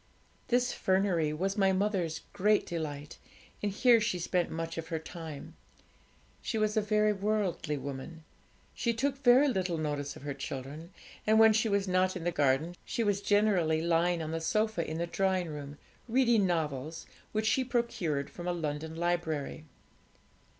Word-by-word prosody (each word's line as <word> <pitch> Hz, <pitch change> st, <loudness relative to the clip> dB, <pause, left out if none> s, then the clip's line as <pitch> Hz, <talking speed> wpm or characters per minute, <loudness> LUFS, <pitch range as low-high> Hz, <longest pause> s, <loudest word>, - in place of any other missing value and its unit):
This 245 Hz, 0 st, +2 dB
fernery 185 Hz, -5 st, +1 dB
was 195 Hz, +6 st, -2 dB
my 195 Hz, -1 st, +4 dB
mother's 190 Hz, -4 st, 0 dB
great 210 Hz, +2 st, +3 dB
delight, 150 Hz, -3 st, -5 dB, 0.4 s
and 205 Hz, -, 0 dB
here 235 Hz, +2 st, +5 dB
she 215 Hz, -4 st, 0 dB
spent 175 Hz, 0 st, 0 dB
much 165 Hz, 0 st, -4 dB
of 160 Hz, -, -6 dB
her 165 Hz, -, -2 dB
time. 160 Hz, -2 st, -8 dB, 0.9 s
She 225 Hz, -, -2 dB
was 215 Hz, -1 st, +1 dB
a 215 Hz, -, +3 dB
very 210 Hz, 0 st, +2 dB
worldly 195 Hz, -7 st, -1 dB
woman; 140 Hz, +4 st, -7 dB, 0.5 s
she 235 Hz, -1 st, -1 dB
took 275 Hz, +3 st, -1 dB
very 255 Hz, +3 st, +6 dB
little 185 Hz, -9 st, 0 dB
notice 145 Hz, -2 st, -3 dB
of -, -, -12 dB
her 145 Hz, -1 st, -3 dB
children; 140 Hz, +4 st, -6 dB, 0.4 s
and 220 Hz, 0 st, +5 dB
when 220 Hz, 0 st, +7 dB
she 220 Hz, +1 st, +2 dB
was 200 Hz, -1 st, +1 dB
not 185 Hz, 0 st, +2 dB
in 180 Hz, -, -5 dB
the 175 Hz, -, 0 dB
garden, 145 Hz, +2 st, +1 dB
she 230 Hz, -, -2 dB
was 205 Hz, -2 st, +1 dB
generally 200 Hz, -7 st, +2 dB
lying 170 Hz, +1 st, +1 dB
on 155 Hz, -, -4 dB
the 165 Hz, 0 st, -2 dB
sofa 215 Hz, +1 st, 0 dB
in 160 Hz, -, -3 dB
the 170 Hz, -, -1 dB
drawing 185 Hz, 0 st, 0 dB
room, 145 Hz, -1 st, -7 dB, 0.3 s
reading 235 Hz, -5 st, +3 dB
novels, 155 Hz, -3 st, -2 dB, 0.3 s
which 215 Hz, 0 st, -1 dB
she 260 Hz, +4 st, +2 dB
procured 190 Hz, -, -1 dB
from 175 Hz, 0 st, -7 dB
a 180 Hz, -, +1 dB
London 160 Hz, -1 st, -4 dB
library. 165 Hz, -3 st, -2 dB
175 Hz, 165 wpm, -30 LUFS, 160-210 Hz, 0.9 s, when